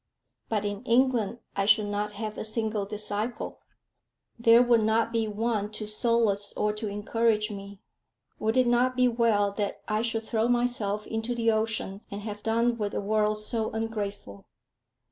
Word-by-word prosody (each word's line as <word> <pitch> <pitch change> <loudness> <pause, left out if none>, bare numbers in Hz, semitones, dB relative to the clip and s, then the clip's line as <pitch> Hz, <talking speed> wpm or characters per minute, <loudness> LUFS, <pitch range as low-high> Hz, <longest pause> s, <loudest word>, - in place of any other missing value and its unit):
But 210 -2 0
in 205 0 -3
England 240 -3 +2 0.2
I 195 - +1
should 215 0 +5
not 205 0 -2
have 215 0 -5
a - - -4
single 215 -2 -2
disciple! 210 +2 -4 0.8
There 235 +1 +7
would 240 -2 +4
not 225 +1 +2
be 225 -1 +1
one 210 -1 -1
to 215 - -5
solace 215 -1 +1
or 210 0 +1
to 215 +1 -4
encourage 215 +1 +1
me! 200 -1 -9 0.6
Would 220 +3 0
it 255 - +5
not 245 +1 +2
be 250 0 +5
well 230 -4 +2
that 200 0 -3
I 215 0 0
should 225 -1 -1
throw 225 0 0
myself 240 -4 0
into 225 +2 -2
the 230 -1 +2
ocean, 215 -2 -2
and 200 +1 -6
have 210 -1 -6
done 230 +2 +1
with 205 -1 -2
a - - 0
world 210 +1 +1
so 220 +1 -1
ungrateful? 205 - -5
220 Hz, 165 wpm, -27 LUFS, 205-230 Hz, 0.8 s, There